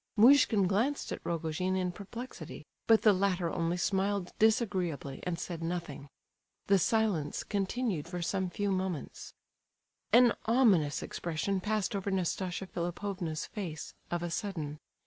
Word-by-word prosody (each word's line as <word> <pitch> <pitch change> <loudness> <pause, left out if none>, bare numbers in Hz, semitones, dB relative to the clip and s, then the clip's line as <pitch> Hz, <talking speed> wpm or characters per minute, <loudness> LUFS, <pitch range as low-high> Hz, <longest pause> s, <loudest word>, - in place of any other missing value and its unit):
Muishkin 235 -3 +6
glanced 225 +10 0
at - - -5
Rogojin 170 +3 -1
in 185 -1 0
perplexity, 220 +7 -8 0.2
but 225 -1 +5
the 215 - +7
latter 185 -3 +1
only 170 +1 -1
smiled 195 0 0
disagreeably, 185 - +1
and 175 -2 -1
said 170 -2 -5
nothing. 165 -5 -4 0.6
The 195 -1 +4
silence 210 -7 +1
continued 200 -4 -1
for 175 0 -4
some 190 +1 -1
few 205 +3 -1
moments. 185 -6 -4 0.8
An 240 0 +7
ominous 215 - +3
expression 175 +3 -2
passed 210 0 -1
over 200 0 -2
Nastasia 185 0 -1
Philipovna's 175 -2 -3
face, 165 -8 -6 0.2
of 175 0 -2
a 175 - -3
sudden. 160 -7 -3
185 Hz, 130 wpm, -31 LUFS, 170-205 Hz, 0.8 s, the